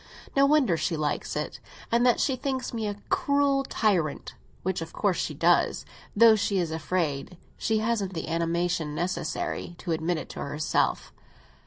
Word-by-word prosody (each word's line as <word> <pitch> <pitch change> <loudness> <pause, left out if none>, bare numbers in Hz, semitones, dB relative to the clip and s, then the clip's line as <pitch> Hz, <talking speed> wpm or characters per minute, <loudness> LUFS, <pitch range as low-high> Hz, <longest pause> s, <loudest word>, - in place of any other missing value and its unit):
No 275 0 +5
wonder 275 - +3
she 160 +1 -1
likes 150 -1 -2
it, - - -3 0.3
and 235 +1 +3
that 245 - +4
she 265 - +2
thinks 260 -1 -3
me 225 -2 -2
a 205 - -3
cruel 280 -1 +2
tyrant; 185 - 0 0.3
which 185 -2 -1
of 165 - -7
course 195 -5 +1
she - - -2
does, - - +2 0.3
though 225 +1 +7
she 205 -1 0
is 170 -3 0
afraid—she 165 +5 -2
hasn't 215 -4 -1
the 160 - -4
animation 165 -1 -1
necessary—to 175 0 -3
admit 165 +1 0
it - - -6
to - - -8
herself. 150 +2 -1
185 Hz, 155 wpm, -27 LUFS, 165-230 Hz, 0.3 s, though